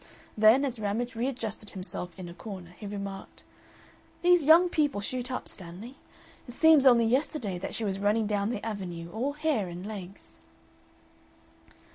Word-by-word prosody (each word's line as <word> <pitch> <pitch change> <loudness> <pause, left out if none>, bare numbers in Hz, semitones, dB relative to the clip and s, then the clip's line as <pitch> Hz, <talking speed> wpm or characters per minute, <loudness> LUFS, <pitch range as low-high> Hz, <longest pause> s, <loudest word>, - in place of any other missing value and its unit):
Then, 220 +6 +6
as 250 -4 -3
Ramage 215 +4 -2
readjusted 230 -3 -3
himself 180 -2 -6
in 185 -2 -7
a 170 - -9
corner, 185 -3 -9
he 210 - -7
remarked: 200 -1 -7 0.8
"These 355 -3 +5
young 335 +3 +8
people 295 -9 +1
shoot 250 +5 -4
up, 255 - -4
Stanley. 190 +8 -7 0.5
It 245 - -8
seems 315 -3 +6
only 235 -2 +6
yesterday 230 - 0
that - - -5
she 225 - -2
was 195 -1 -2
running 210 +2 +2
down 205 0 0
the 230 -3 -4
Avenue, 175 -6 -5
all 255 +6 -2
hair 295 -9 0
and 175 +2 -7
legs." 200 -3 -8
215 Hz, 155 wpm, -28 LUFS, 195-255 Hz, 0.8 s, young